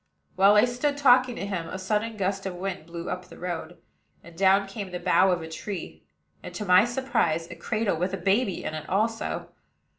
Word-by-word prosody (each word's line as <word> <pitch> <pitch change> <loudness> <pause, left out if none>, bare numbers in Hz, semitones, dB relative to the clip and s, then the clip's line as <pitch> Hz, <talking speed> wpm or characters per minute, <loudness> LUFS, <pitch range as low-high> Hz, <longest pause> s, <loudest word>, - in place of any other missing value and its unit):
While 200 +2 +6
I 210 - +6
stood 250 +4 -1
talking 255 -3 +5
to 195 - -4
him, 180 -5 -4
a - - -5
sudden 215 +3 -2
gust 195 0 -1
of 185 - -5
wind 180 -3 -5
blew 170 +1 -7
up 180 0 -4
the - - -14
road, 175 -1 -5 0.5
and 170 -1 -14
down 195 +2 +4
came 195 -1 -6
the 180 0 -5
bough 185 +1 +4
of 175 -2 0
a - - -6
tree; 175 +4 -7 0.4
and, - - -9
to 210 - -4
my 180 +2 +6
surprise, 240 -10 0
a - - -7
cradle 215 -5 -1
with 180 +3 -1
a 195 - -3
baby 195 0 0
in - - -4
it 155 -1 -6
also. 225 +4 -1
195 Hz, 210 wpm, -26 LUFS, 180-215 Hz, 0.5 s, While